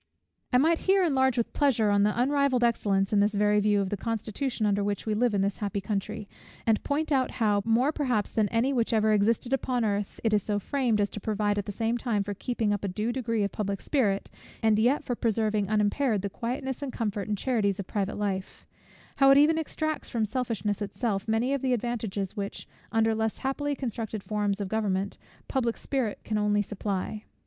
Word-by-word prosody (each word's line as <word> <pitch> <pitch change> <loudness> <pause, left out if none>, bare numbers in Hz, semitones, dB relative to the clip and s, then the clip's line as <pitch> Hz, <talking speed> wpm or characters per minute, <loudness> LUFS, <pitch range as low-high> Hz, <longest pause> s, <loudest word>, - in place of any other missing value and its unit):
I 250 - +5
might 325 +5 +3
here 385 0 +5
enlarge 265 -6 +2
with 235 - -1
pleasure 235 -7 +2
on 200 0 +3
the 210 +3 +2
unrivalled 275 -1 +2
excellence, 200 -4 +1
in 205 - +4
this 205 +1 +2
very 210 +1 +3
view, 205 0 +3
of 190 - -3
the 205 - -1
constitution 225 +3 -2
under 205 -1 +2
which 205 0 -2
we 215 - 0
live 225 0 +2
in 195 - +2
this 200 0 -1
happy 205 -1 -2
country; 205 +1 -3 0.4
and 220 -2 +2
point 305 +2 -1
out 265 -2 +2
how, 210 -3 +2
more 235 +6 +3
perhaps 250 -9 0
than 215 -2 +1
any 240 +4 +1
which 235 -2 0
ever 215 -1 +3
existed 225 +4 +1
upon 250 -3 0
earth, 205 -1 -2
it 225 -2 +2
is 210 - +4
so 205 +1 -1
framed, 235 0 0
as 205 0 +1
to - - -6
provide 205 0 0
at 205 - -5
the - - -2
same 225 +3 -1
time 220 -5 0
for 205 +1 -4
keeping 220 0 -1
up 205 - -3
a - - 0
due 210 +5 -2
degree 230 -4 -1
of 200 - -1
public 200 -2 -2
spirit, 205 -9 0 0.4
and 215 -1 +4
yet 250 +6 +3
for 245 - -2
preserving 215 -3 0
unimpaired 215 +1 +1
the 200 - -3
quietness, 260 +4 -4
and 280 -2 -3
comfort, 210 -5 -3
and 210 -1 -1
charities 205 -5 0
of 200 - -3
private 200 +1 -2
life; 195 -2 -3 0.5
how 275 -1 +6
it 275 - +7
even 315 +3 +5
extracts 310 0 -3
from 230 -3 0
selfishness 215 -3 -2
itself 205 0 -2
many 225 +5 +1
of 280 - -1
the 260 -1 +1
advantages 220 -5 -2
which, 200 -2 -5 0.2
under 225 0 +3
less 220 0 -1
happily 285 +2 -2
constructed 225 -5 -4
forms 205 -2 -1
of 200 - -2
government, 200 -2 -1 0.3
public 240 -4 0
spirit 255 -7 -2 0.2
only 210 0 +2
can - - -19
supply. 205 +1 -3
220 Hz, 210 wpm, -28 LUFS, 205-250 Hz, 0.5 s, it